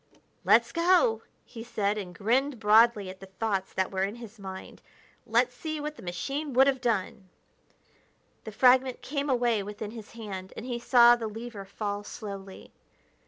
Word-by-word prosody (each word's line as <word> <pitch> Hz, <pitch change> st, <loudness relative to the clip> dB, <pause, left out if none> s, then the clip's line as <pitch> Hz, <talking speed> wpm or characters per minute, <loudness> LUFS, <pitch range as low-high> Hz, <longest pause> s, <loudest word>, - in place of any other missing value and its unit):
"Let's -, -, +4 dB
go!" 335 Hz, -10 st, +3 dB, 0.2 s
he 225 Hz, -2 st, -9 dB
said, 210 Hz, -3 st, -1 dB
and 185 Hz, -4 st, -7 dB
grinned 250 Hz, +5 st, +1 dB
broadly 215 Hz, -1 st, +4 dB
at 190 Hz, -, -14 dB
the 195 Hz, -, -11 dB
thoughts 195 Hz, 0 st, -2 dB
that 190 Hz, -1 st, -1 dB
were 190 Hz, -1 st, -2 dB
in 200 Hz, +3 st, -1 dB
his 230 Hz, -2 st, -11 dB
mind. 190 Hz, -1 st, -9 dB, 0.5 s
"Let's 240 Hz, +2 st, +2 dB
see 310 Hz, +3 st, -4 dB
what 300 Hz, +1 st, -5 dB
the -, -, -13 dB
machine 275 Hz, -, -4 dB
would 265 Hz, +2 st, +6 dB
have 270 Hz, -2 st, +1 dB
done!" 210 Hz, -4 st, -2 dB, 1.1 s
The 220 Hz, -, -7 dB
fragment 255 Hz, +3 st, +3 dB
came 285 Hz, +1 st, -3 dB
away 240 Hz, -4 st, +2 dB
within 210 Hz, +1 st, -6 dB
his 225 Hz, -2 st, -11 dB
hand, 195 Hz, -5 st, -7 dB
and 225 Hz, -, -6 dB
he 245 Hz, -2 st, -3 dB
saw 240 Hz, 0 st, +6 dB
the 230 Hz, -2 st, -4 dB
lever 220 Hz, -2 st, -8 dB
fall 205 Hz, +1 st, -4 dB
slowly. 195 Hz, -2 st, -9 dB
225 Hz, 165 wpm, -28 LUFS, 200-250 Hz, 1.1 s, would